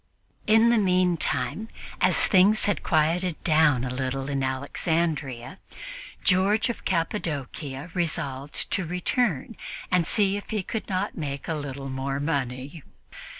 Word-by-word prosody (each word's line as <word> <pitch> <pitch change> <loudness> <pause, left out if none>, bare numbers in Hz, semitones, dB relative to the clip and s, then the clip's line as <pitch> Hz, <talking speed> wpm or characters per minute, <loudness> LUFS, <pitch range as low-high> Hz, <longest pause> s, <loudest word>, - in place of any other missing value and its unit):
In 225 +2 +5
the 235 - +4
meantime, 180 - 0 0.3
as - - +6
things 200 +3 +5
had 205 -7 +1
quieted 165 +2 +1
down 155 -6 +4
a 125 -1 -3
little 135 +1 -3
in 135 -1 -1
Alexandria, 140 +2 -2 0.6
George 200 +5 +3
of 235 - -11
Cappadocia 150 -4 -3
resolved 145 -5 -2
to 190 - 0
return 180 - -1 0.4
and 175 -3 +2
see 200 -2 +3
if 205 - -9
he 215 -3 -1
could 220 +4 -5
not 190 +2 -2
make 140 -2 -4
a 165 - -1
little 140 -2 -5
more 135 +1 -3
money. 140 0 -3
160 Hz, 130 wpm, -26 LUFS, 135-190 Hz, 0.6 s, as